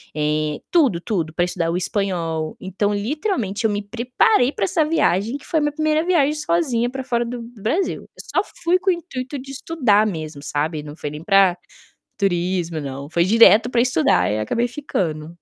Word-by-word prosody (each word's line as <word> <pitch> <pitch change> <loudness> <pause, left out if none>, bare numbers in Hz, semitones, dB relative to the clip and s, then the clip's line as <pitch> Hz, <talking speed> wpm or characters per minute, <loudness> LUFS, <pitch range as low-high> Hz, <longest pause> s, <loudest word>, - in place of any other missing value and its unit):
Eh, 150 0 -1
tudo 275 - +3
tudo 165 -5 -2
para 175 +1 +1
estudar 170 -2 -2
o 175 - -1
espanhol. 170 -5 -2
Então, 200 +2 -1
literalmente, 230 - -2
eu - - +4
me 205 0 -1
preparei 250 - +2
para 195 - -1
essa 310 - +1
viagem, 235 - +1
que - - -17
foi 320 - +1
minha 295 0 +1
1º 310 +1 +1
viagem 305 -5 +3
sozinha 300 -7 0
para 265 +1 -5
fora 240 -2 0
do 240 0 -5
do 230 -3 -12
Brasil. 345 - -1
Eu - - -12
só - - +5 0.2
fui 350 +2 +4
com 380 - 0
o - - +3
intuito 280 -5 -6
de 270 +1 -9
estudar 255 -8 +2
mesmo, 155 -6 -5
sabe, 150 +1 -2
não 150 0 -9
foi 150 - -5
nem 150 +2 -8
para 195 -2 +4 0.6
turismo 175 -4 -1
não, 140 +1 -6
foi 170 0 +2
direto 225 +2 +6
para 235 -1 +2
estudar 155 - +2
e 105 - -1
acabei 235 - 0
ficando. 170 - -3
205 Hz, 190 wpm, -21 LUFS, 165-270 Hz, 0.6 s, direto